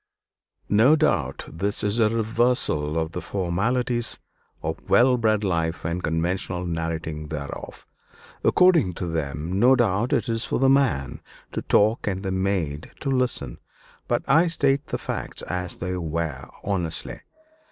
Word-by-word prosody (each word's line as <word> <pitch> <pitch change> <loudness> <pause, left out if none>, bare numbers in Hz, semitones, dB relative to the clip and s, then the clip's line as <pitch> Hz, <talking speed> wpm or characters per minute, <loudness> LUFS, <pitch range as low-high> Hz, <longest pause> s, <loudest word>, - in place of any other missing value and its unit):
No 115 +9 +5
doubt 70 - 0
this 100 +6 -2
is 105 +3 0
a 110 -2 +4
reversal 110 - +1
of 80 0 -1
the 90 - -5
formalities 115 +6 0 0.5
of - - -3
well 125 +1 +5
bred 110 -3 +1
life 85 -4 -1
and 85 +2 -2
conventional 90 +2 -1
narrating 80 -2 -3
thereof. 75 -2 -7 0.6
According 165 - +4
to 90 - -4
them, 80 +2 -3
no 125 +4 +6
doubt, 115 -1 +1
it - - +1
is 115 -1 0
for - - -1
the 135 0 +4
man 135 - +1 0.3
to - - -3
talk 110 +2 +2
and 95 -1 -2
the 95 - -2
maid 95 -6 -1
to 135 - -1
listen; 125 -1 -1 0.5
but - - 0
I 160 +6 +5
state 140 -3 +1
the - - -2
facts - - -5
as 90 -1 -4
they 90 0 -3
were, 85 -2 -3
honestly. 90 -5 -2
95 Hz, 145 wpm, -24 LUFS, 80-120 Hz, 0.6 s, no